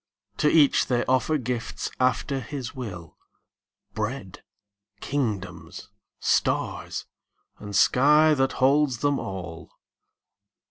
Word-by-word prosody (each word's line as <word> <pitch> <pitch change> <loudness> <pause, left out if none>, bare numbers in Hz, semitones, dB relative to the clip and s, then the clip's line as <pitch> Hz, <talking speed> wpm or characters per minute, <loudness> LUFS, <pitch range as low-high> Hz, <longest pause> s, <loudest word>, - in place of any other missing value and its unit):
To 150 - +3
each 150 -3 +4
they 120 -1 0
offer 130 +4 +2
gifts 125 -3 -4
after 130 +2 +1
his 130 0 -6
will, 90 - -8 0.8
Bread, 110 -3 -5 0.6
kingdoms, 100 - -4 0.3
stars, - - -1 0.5
and 100 -1 -7
sky 150 +7 +5
that 135 -2 +1
holds 135 -2 +2
them 145 -1 +1
all. 85 -4 -7
130 Hz, 95 wpm, -25 LUFS, 105-140 Hz, 0.8 s, sky